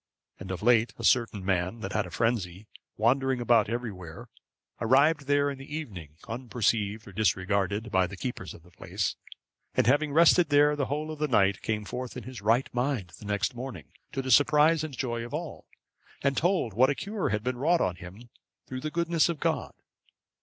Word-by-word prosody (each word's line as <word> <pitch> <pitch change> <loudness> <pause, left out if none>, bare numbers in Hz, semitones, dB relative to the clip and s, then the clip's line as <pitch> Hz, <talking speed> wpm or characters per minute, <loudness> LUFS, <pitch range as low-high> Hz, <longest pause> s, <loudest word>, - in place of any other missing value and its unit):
And 95 - -8
of 95 +1 -5
late, 115 -2 +3
a - - -8
certain 115 -6 +2
man 95 +3 -1
that 95 -1 -5
had 105 - 0
a - - -10
frenzy, 105 -5 -1 0.3
wandering 130 +3 +2
about 120 -3 +3
everywhere, 100 -9 -6 0.5
arrived 140 +5 +3
there 145 0 +2
in 135 - -8
the 140 +2 -8
evening, 90 - -7
unperceived 110 -3 -1
or - - -9
disregarded 100 +3 0
by 95 -2 +3
the 100 +2 -9
keepers 90 - -5
of 85 - -16
the 90 - -20
place, - - -3 0.6
and - - +3
having 145 +5 +3
rested 170 +1 +5
there 145 0 +4
the 140 -3 -1
whole 150 +2 -3
of 155 - -8
the 150 - +1
night, 100 -7 +2
came 105 -2 -2
forth 125 +3 -6
in 125 - -7
his 125 -1 -9
right 115 +5 +2
mind 125 -8 -1
the - - -11
next 105 +4 -1
morning, 120 - -8 0.2
to 135 - -3
the 130 - -2
surprise 150 +4 +5
and 145 -5 -6
joy 120 -2 -2
of 120 +5 -5
all, 160 0 -7 0.6
and 140 0 +2
told 175 - +1
what 130 +6 +4
a 145 - 0
cure 205 +4 -3
had 105 0 -1
been 125 0 -2
wrought 165 +5 +3
on 90 -1 0
him 100 +8 -12 0.3
through 130 0 -6
the 155 - -3
goodness 170 0 +1
of 165 -3 -3
God. - - -1
120 Hz, 195 wpm, -28 LUFS, 100-145 Hz, 0.6 s, rested